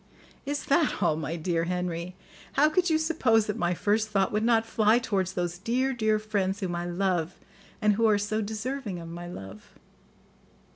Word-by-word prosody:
"Is 290 +1 -2
that 295 -7 +2
all, 155 - +3
my 160 +1 -3
dear 165 0 -1
Henry? 180 0 -3 0.4
How 300 +2 +4
could 355 +3 +2
you 320 - +3
suppose 265 -9 +2
that 210 - -2
my 175 0 0
first 215 +4 +1
thought 195 -2 +1
would 210 +1 0
not 225 -1 +3
fly 220 0 +3
towards 195 -6 -1
those 175 -1 -3
dear, 255 +6 0
dear 220 -3 +2
friends 205 -2 -1
whom 185 -4 -2
I 175 0 -3
love 175 -1 -1 0.5
and 210 0 +5
who 225 +2 +3
are 210 -1 +4
so 210 +2 -1
deserving 220 0 -4
of 165 -1 -8
my 175 +1 -7
love?" 100 - -10
205 Hz, 185 wpm, -27 LUFS, 175-225 Hz, 0.5 s, and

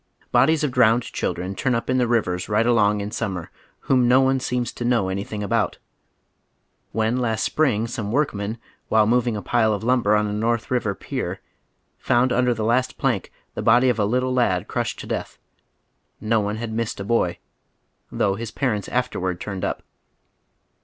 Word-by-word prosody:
Bodies 145 +6 +4
of 145 - 0
drowned 120 -1 +4
children 90 -2 -3
turn 125 +5 0
up 115 - -2
in 130 0 +1
the 125 - +2
rivers 95 -7 0
right 105 +2 +2
along 105 -3 +3
in 100 +1 -5
summer 95 -8 -4 0.3
whom 125 -2 +2
no 125 +2 +6
one 135 0 +3
seems 125 -1 -2
to - - -6
know 120 -6 +1
anything 100 +2 -4
about. 115 +1 0 1.1
When 110 +3 0
last 115 -3 0
spring 125 -8 +1
some 115 -3 -4
workmen, 110 -6 -1 0.3
while 110 -1 +4
moving 120 0 +1
a 100 - -6
pile 110 -3 +2
of 100 - -7
lumber 120 -4 +3
on 105 0 +2
a 105 - -3
North 115 +2 0
Eiver 110 -6 -1
pier, - - -4 0.6
found 125 +1 +2
under 125 0 +2
the 110 -1 -2
last 125 +3 +1
piank 125 -8 -1 0.2
the - - -4
body 120 +3 +5
of 120 -3 0
a 105 - +3
little 125 +4 0
lad 105 -8 +1
crushed - - -2
to - - -8
death, - - -4 0.8
no 110 +1 +1
one 105 0 -2
had 110 0 -5
missed 115 -2 -2
a - - -3
boy, 100 -5 +1 0.7
though 100 - +1
liis 110 +2 -6
parents 115 -7 -1
afterward 95 -8 -1
turned 100 -3 -5
up. - - -2
115 Hz, 180 wpm, -23 LUFS, 105-125 Hz, 1.1 s, no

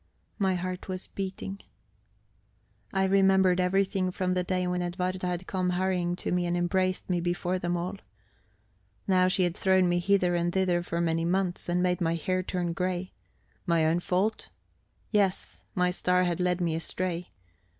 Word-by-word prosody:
My 190 -2 +2
heart 180 +1 -4
was 185 0 -5
beating. 195 0 -5 1.3
I 190 0 +2
remembered 190 -1 +4
everything 190 +1 +1
from 185 0 -1
the 180 0 0
day 185 0 -1
when 180 0 -1
Edwarda 180 +1 -2
had 180 0 -3
come 185 -1 -1
hurrying 180 -1 0
to - - -4
me 180 0 +1
and 175 0 0
embraced 185 +1 0
me 175 -2 0
before 175 +1 -1
them 175 0 -1
all. 180 +4 -4 1.1
Now 185 -1 +4
she 185 0 +2
had 175 -1 0
thrown 190 -1 +3
me 175 0 +2
hither 185 -1 +2
and 175 0 +1
thither 180 -2 +1
for 170 -1 -2
many 165 -1 +1
months, 180 0 -1
and 180 +1 +1
made 180 0 +1
my 165 -1 +1
hair 185 +3 -1
turn 175 -2 -2
grey. 180 +1 -2 0.5
My 165 -2 +3
own 165 +2 +2
fault? 190 +5 -1 0.6
Yes, 200 -3 0
my 180 0 +2
star 180 0 +2
had 175 -1 0
led 180 0 +1
me 170 -2 +1
astray. 175 +2 -2
180 Hz, 170 wpm, -28 LUFS, 175-185 Hz, 1.3 s, remembered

